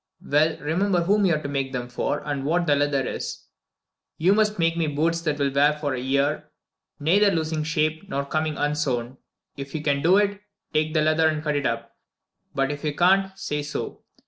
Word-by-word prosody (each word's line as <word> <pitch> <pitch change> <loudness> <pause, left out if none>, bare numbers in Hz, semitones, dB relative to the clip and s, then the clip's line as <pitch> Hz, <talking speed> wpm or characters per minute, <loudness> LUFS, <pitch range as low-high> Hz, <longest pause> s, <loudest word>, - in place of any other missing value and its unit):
Well, 155 +3 +2
remember 175 +5 0
whom 205 +3 +3
you 170 - +3
are 150 - -3
to - - -3
make 135 -1 -2
them 125 -1 -3
for, 125 +4 -2
and 145 -2 -2
what 170 +5 +1
the 145 -3 +3
leather 140 -2 +1
is. - - -5 0.7
You 180 +5 +4
must 210 0 +2
make 165 -1 +2
me 165 -2 0
boots 165 +3 0
that 155 -3 -1
will 140 -1 0
wear 145 +2 +4
for 150 -2 -3
a 130 - -3
year, 140 +3 0 0.5
neither 195 +8 +4
losing 160 -3 -1
shape 155 +3 -1
nor 140 0 -2
coming 155 0 -1
unsown. 135 -4 -1 0.4
If 140 +1 -7
you 155 - -3
can 140 -2 +1
do 180 +5 +5
it, 205 -1 +1 0.3
take 155 +1 0
the 155 - +3
leather 155 +1 +3
and 155 -1 -1
cut 150 -1 0
it 145 - +1
up; 115 0 -4 0.6
but 135 +1 +1
if 145 +1 -6
you 150 -2 -2
can't, 190 +2 +3
say 150 -6 -3
so. 145 +1 -5
150 Hz, 205 wpm, -24 LUFS, 140-165 Hz, 0.7 s, do